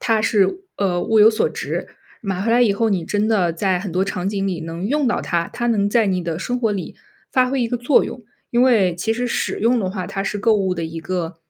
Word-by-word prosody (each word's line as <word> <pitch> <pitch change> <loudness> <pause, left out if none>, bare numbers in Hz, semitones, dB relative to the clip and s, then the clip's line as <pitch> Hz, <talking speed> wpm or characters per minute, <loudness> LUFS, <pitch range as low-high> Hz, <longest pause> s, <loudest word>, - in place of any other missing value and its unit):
它 225 -3 +1
是， 200 - +2 0.2
呃， 185 -3 0
物 220 -1 +3
有 215 +1 +8
所 220 - +1
值。 - - -4 0.4
买 195 -3 -2
回 225 - 0
来 240 - +4
以 220 -4 +4
后 225 +3 +1
你 185 -4 0
真 210 +4 0
的 185 -6 +2
在 185 +2 0
很 190 -1 -6
多 185 +2 +1
场 185 -1 -3
景 200 -1 -2
里 180 -4 -2
能 165 +3 -6
用 285 +3 +1
到 240 - +1
它， 170 -1 -1
它 240 - -2
能 205 -3 +2
在 225 -1 +3
你 185 -2 0
的 165 -2 -2
生 245 +6 -2
活 225 -3 +1
里 195 -3 -5 0.4
发 255 -1 +3
挥 270 -1 0
一 235 - -1
个 245 - -1
作 245 +3 +3
用。 245 - -7 0.3
因 240 +1 +3
为 215 -9 +4
其 220 +6 -1
实 245 +2 -2
使 - - -2
用 235 +3 +3
的 190 - -1
话， 185 -2 -4
它 195 - -4
是 205 - -2
购 220 +2 +3
物 190 -2 0
的 165 -2 -3
一 160 +1 -6
个， 170 0 -3
200 Hz, 280 characters per minute, -20 LUFS, 185-230 Hz, 0.4 s, 有